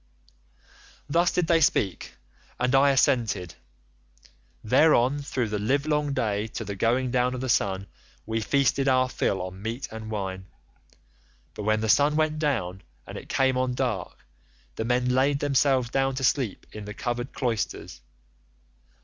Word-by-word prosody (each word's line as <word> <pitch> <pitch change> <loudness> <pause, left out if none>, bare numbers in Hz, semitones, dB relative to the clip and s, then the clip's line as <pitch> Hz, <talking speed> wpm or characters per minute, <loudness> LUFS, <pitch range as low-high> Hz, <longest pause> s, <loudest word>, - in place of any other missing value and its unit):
"Thus 170 +4 +2
did 180 - 0
they 165 0 +3
speak 100 - 0 0.4
and 125 +1 +1
I 135 +1 +5
assented. 115 - +1 1.1
Thereon 130 +2 +4
through 130 -5 -2
the 105 0 -2
livelong 145 +5 0
day 105 -3 -1
to 110 - -4
the 100 - -4
going 120 +5 +1
down 125 0 +1
of 125 - -5
the 130 - -3
sun 100 -3 +1 0.4
we 110 0 -2
feasted 135 +3 +1
our 130 -1 +3
fill 95 -6 -1
on 95 +1 -8
meat 115 +5 -4
and 110 0 -7
wine, 95 -3 -4 1.1
but - - -7
when 110 0 +2
the 110 - -1
sun 145 +7 +4
went 155 0 +1
down 105 - -1 0.2
and - - -9
it - - -9
came 130 -1 +2
on 130 -1 -1
dark 125 -7 -3 0.5
the 110 - -3
men 125 +1 +1
laid 135 +3 +2
themselves 135 -3 +2
down 135 -1 +1
to 130 - -4
sleep 125 -5 0
in 105 -1 -8
the 105 +1 -8
covered 120 +2 -3
cloisters. 115 - -3
125 Hz, 155 wpm, -26 LUFS, 110-135 Hz, 1.1 s, I